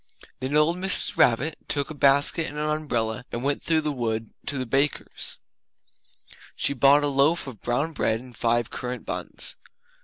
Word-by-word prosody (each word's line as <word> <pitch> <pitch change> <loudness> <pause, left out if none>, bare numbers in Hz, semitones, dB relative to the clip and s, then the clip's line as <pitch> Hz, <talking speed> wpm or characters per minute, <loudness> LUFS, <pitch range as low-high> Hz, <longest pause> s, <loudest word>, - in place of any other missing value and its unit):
Then 130 +3 -2
old 155 +3 +3
Mrs. 190 +1 +1
Rabbit 130 +7 +3
took 140 0 0
a - - -5
basket 140 +3 +3
and 145 - -7
her 150 0 0
umbrella 120 -6 -2
and 120 - -4
went 140 +1 0
through 160 -1 +2
the 150 -1 -1
wood 115 -4 -3 0.2
to 140 - -1
the 130 - -2
baker's. 135 +4 -1 1.2
She - - 0
bought 140 +2 +5
a - - +2
loaf 145 +4 +2
of 130 -7 -9
brown 130 +7 -1
bread 115 -7 0
and 125 0 -13
five 120 0 +1
currant 125 0 -5
buns. - - -2
140 Hz, 175 wpm, -25 LUFS, 120-150 Hz, 1.2 s, bought